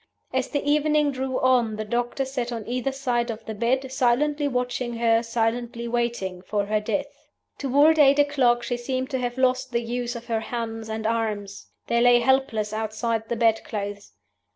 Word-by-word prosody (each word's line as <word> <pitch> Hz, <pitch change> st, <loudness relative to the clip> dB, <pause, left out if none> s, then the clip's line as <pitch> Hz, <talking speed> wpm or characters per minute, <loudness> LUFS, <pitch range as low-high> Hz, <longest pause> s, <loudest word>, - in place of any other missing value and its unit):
As -, -, 0 dB
the 285 Hz, -1 st, -3 dB
evening 300 Hz, 0 st, +3 dB
drew 260 Hz, -1 st, -2 dB
on 245 Hz, -4 st, +3 dB
the 215 Hz, 0 st, -4 dB
doctors 245 Hz, +4 st, -2 dB
sat 250 Hz, -3 st, -2 dB
on 225 Hz, -3 st, -5 dB
either 250 Hz, +3 st, -1 dB
side 245 Hz, -3 st, -1 dB
of 225 Hz, -1 st, -6 dB
the 220 Hz, -, -5 dB
bed, 255 Hz, +5 st, 0 dB
silently 285 Hz, +4 st, +1 dB
watching 250 Hz, -2 st, -2 dB
her, 230 Hz, 0 st, +3 dB
silently 235 Hz, +1 st, -2 dB
waiting 235 Hz, -6 st, -2 dB
for 205 Hz, +1 st, -1 dB
her 215 Hz, +1 st, +1 dB
death. 285 Hz, +6 st, -4 dB, 0.3 s
"Toward 290 Hz, +4 st, +4 dB
eight 280 Hz, -1 st, +6 dB
o'clock 265 Hz, -5 st, +3 dB
she 245 Hz, 0 st, -2 dB
seemed 255 Hz, +2 st, -3 dB
to 260 Hz, -, -1 dB
have 245 Hz, 0 st, -3 dB
lost 260 Hz, 0 st, +1 dB
the 235 Hz, -1 st, 0 dB
use 245 Hz, +1 st, -3 dB
of 235 Hz, 0 st, -7 dB
her 225 Hz, -2 st, -1 dB
hands 225 Hz, -1 st, -5 dB
and 220 Hz, 0 st, -4 dB
arms: 215 Hz, -3 st, -2 dB, 0.2 s
they 235 Hz, 0 st, +1 dB
lay 245 Hz, 0 st, +6 dB
helpless 235 Hz, -4 st, +1 dB
outside 220 Hz, +1 st, -2 dB
the 235 Hz, -, 0 dB
bed 225 Hz, -1 st, +2 dB
clothes. 205 Hz, -, -6 dB
240 Hz, 180 wpm, -25 LUFS, 225-265 Hz, 0.3 s, eight